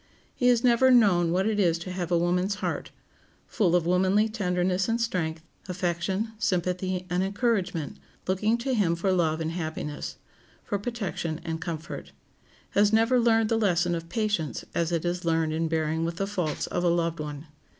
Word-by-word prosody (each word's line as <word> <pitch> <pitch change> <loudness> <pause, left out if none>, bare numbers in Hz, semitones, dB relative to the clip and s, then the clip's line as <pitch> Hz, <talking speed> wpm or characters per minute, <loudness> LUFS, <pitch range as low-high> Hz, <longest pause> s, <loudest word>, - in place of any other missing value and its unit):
He 245 - +1
has 240 -2 +4
never 250 +1 +5
known 195 -9 +5
what 185 +2 +1
it 215 -1 0
is 170 -4 +3
to 170 +2 -7
have 180 -1 -4
a 175 - +4
woman's 180 +3 +1
heart, - - -3 0.6
full 180 -7 +1
of 175 -2 +2
womanly 190 +4 +3
tenderness 185 -2 0
and 230 +1 +1
strength, 165 -8 -2 0.3
affection, 185 +4 -1
sympathy, 185 -1 -1
and 180 0 0
encouragement, 195 - -1 0.3
looking 210 +5 +1
to 260 +3 -2
him 190 -8 +2
for 190 +3 0
love 165 -3 +1
and 160 0 -2
happiness, 160 -3 -5 0.5
for 205 -3 -2
protection 195 -8 -3
and 165 -1 -3
comfort; 165 0 -6 0.6
has 205 +1 +4
never 225 +3 +4
learned 225 -2 +3
the 225 - +2
lesson 175 -4 +2
of 165 0 -4
patience 190 - -1
as 170 0 0
it 170 0 -1
is 175 +1 -1
learned 165 -2 +1
in 165 +1 0
bearing 160 0 0
with 170 +1 -2
the 195 - 0
faults 180 -6 -2
of 175 - -2
a - - +3
loved 170 -1 0
one. 150 0 -6
180 Hz, 180 wpm, -27 LUFS, 165-210 Hz, 0.6 s, never